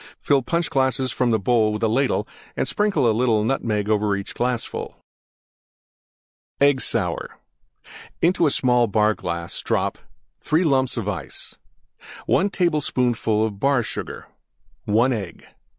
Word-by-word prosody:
Fill 140 -2 +2
Punch 170 +5 -1
glasses 130 -1 +1
from 125 -1 0
the 115 - +3
bowl 110 +1 +2
with 105 +1 -4
ladle 125 +5 +1 0.3
and - - 0
sprinkle 205 - +1
a 110 - +3
little 110 -2 +2
Nutmeg 110 -4 -1
over 105 -1 +1
each 100 0 -6
glassful. 120 -1 -3 1.6
EGG 140 -2 +4
SOUR - - -2 0.8
Into 170 -2 +3
small 125 -3 +2
Bar 105 +1 +2
glass 85 -3 -4
drop: - - -1 0.4
3 160 +4 +1
lumps 130 -5 +1
Ice. 100 - -5 0.7
1 200 - +2
tablespoonful 125 - 0
Bar 130 +5 +1
Sugar. - - -6 0.6
1 115 +5 +3
Egg. 100 -6 -6
120 Hz, 120 wpm, -22 LUFS, 105-135 Hz, 1.6 s, EGG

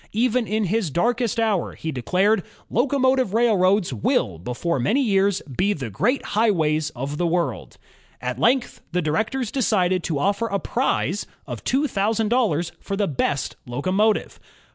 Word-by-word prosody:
Even 240 +1 +1
in 215 +1 0
his 205 -1 0
darkest 230 - 0
hour, 215 -5 0
he 160 - -4
declared: 185 - +1 0.2
'* - - -30
Locomotive 260 -3 +2
railroads 200 - +3
will, 100 -5 0
before 125 - -2
many 220 - +2
years, 200 -3 +2
be 185 +10 0
the 130 - -6
great 245 - 0
highways 160 -8 +2
of 140 +4 -4
the 175 - +2
world." 170 0 -2 0.4
At - - -4
length 250 +1 +1
the 180 -1 +1
directors 220 - -1
decided 185 -8 +1
to 155 - -1
offer 200 +9 0
a 200 -2 -1
prize - - -1 0.2
of - - -7
two 280 +3 +1
thousand 215 0 0
dollars 195 -10 +1
for 200 - -3
the 200 0 0
best 140 -1 -1
locomotive. 185 - 0
200 Hz, 155 wpm, -23 LUFS, 160-230 Hz, 0.4 s, railroads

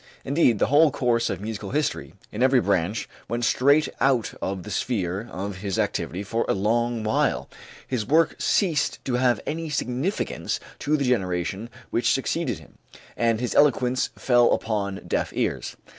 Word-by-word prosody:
Indeed, 135 -5 +3
the - - +2
whole 150 +4 +5
course 120 -4 +1
of - - -3
musical 105 -2 -5
history 150 +2 -2 0.2
in 105 - -5
every 130 0 +5
branch 100 -1 0 0.2
went 120 +1 -1
straight 140 +6 +4
out 130 -4 +2
of 95 -1 -3
the 105 - -8
sphere 100 0 -2
of 95 +1 -5
his 100 -1 -3
activity 90 +4 -1
for 115 +3 -1
a - - +2
long 115 +3 0
while; 110 - +1 0.4
his 125 -4 -1
work 160 +8 +3
ceased 165 -8 +1
to 130 - -2
have 125 0 +2
any 160 +1 -3
significance 135 - -2 0.2
to 150 +1 +1
the 140 - -1
generation 95 -2 -1 0.2
which 120 +1 +2
succeeded 135 - -1
him, - - -18 0.4
and 115 -2 +1
his 125 0 -2
eloquence 130 -3 +3
fell 120 -2 +4
upon 100 -3 -2
deaf - - -1
ears. - - -2
120 Hz, 160 wpm, -25 LUFS, 105-135 Hz, 0.4 s, whole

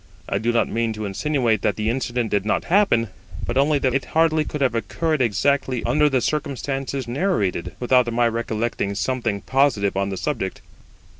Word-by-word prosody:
I 100 - -1
do 115 +3 +1
not 120 - +2
mean 115 0 -1
to 110 0 -5
insinuate 115 +1 0
that - - +1
the 110 +1 0
incident 120 -2 -2
did 100 -1 +1
not 105 - 0
happen, 155 - +3 0.4
but 120 - -3
only 145 +3 +3
that 130 -3 0
it 135 - +2
could - - -15
hardly 160 -1 +3
have 130 -4 +2
occurred 140 - -1
exactly 130 +3 +1
under 150 0 +3
the 130 -3 +1
circumstances 135 -2 -2
narrated, 120 - -1
without 125 -1 +3
my 120 +1 +2
recollecting 115 -3 -2
something 115 -3 -1
positive 130 -8 +1
on 100 0 0
the 95 - -4
subject. - - -3
120 Hz, 175 wpm, -22 LUFS, 110-140 Hz, 0.4 s, happen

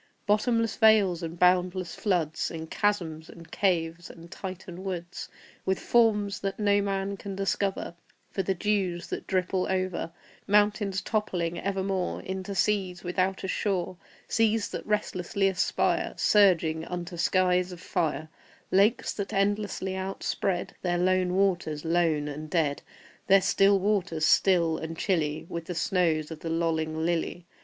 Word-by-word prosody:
Bottomless 230 +2 +1
vales 210 -6 +5
and 165 0 -5
boundless 180 0 +2
floods, 170 -6 -1
And 160 -1 -7
chasms, 170 -7 -1
and 165 -1 -13
caves, 170 -3 0
and 170 +1 -13
Titan 185 -1 -7
woods, 180 -2 -5 0.3
With 190 0 0
forms 210 -4 +2
that 195 0 -3
no 205 -1 +3
man 195 0 -2
can 195 -1 -6
discover 195 -1 -1 0.4
For 195 - -1
the 190 +1 -1
dews 185 -3 -1
that - - -5
drip 185 -1 -1
all 185 -1 +1
over; 185 -3 -2 0.4
Mountains 205 -2 +2
toppling 180 -6 -1
evermore 190 -1 -2
Into 190 +1 -5
seas 190 -2 0
without 185 +2 -1
a - - -2
shore; 190 -2 -1 0.3
Seas 225 -1 +1
that - - -6
restlessly 200 -2 0
aspire, 190 -2 0
Surging, 170 -6 +3
unto 175 0 -5
skies 180 +1 +2
of 180 - -9
fire; 160 -3 -2 0.4
Lakes 200 +5 +3
that 200 -2 -4
endlessly 200 -1 0
outspread 190 -1 -2
Their 175 -1 0
lone 185 0 +2
waters 175 -6 0
lone 165 -3 +1
and 150 +1 -6
dead, 155 -4 0 0.5
Their 195 +1 +7
still 195 +1 +4
waters 190 -5 0
still 170 -2 +3
and 160 0 -6
chilly 155 -6 -1
With 170 -1 -5
the 180 - -5
snows 165 -3 +1
of 160 - -7
the 165 - -5
lolling 160 -1 -1
lily. 170 0 -2
185 Hz, 145 wpm, -27 LUFS, 170-195 Hz, 0.5 s, Their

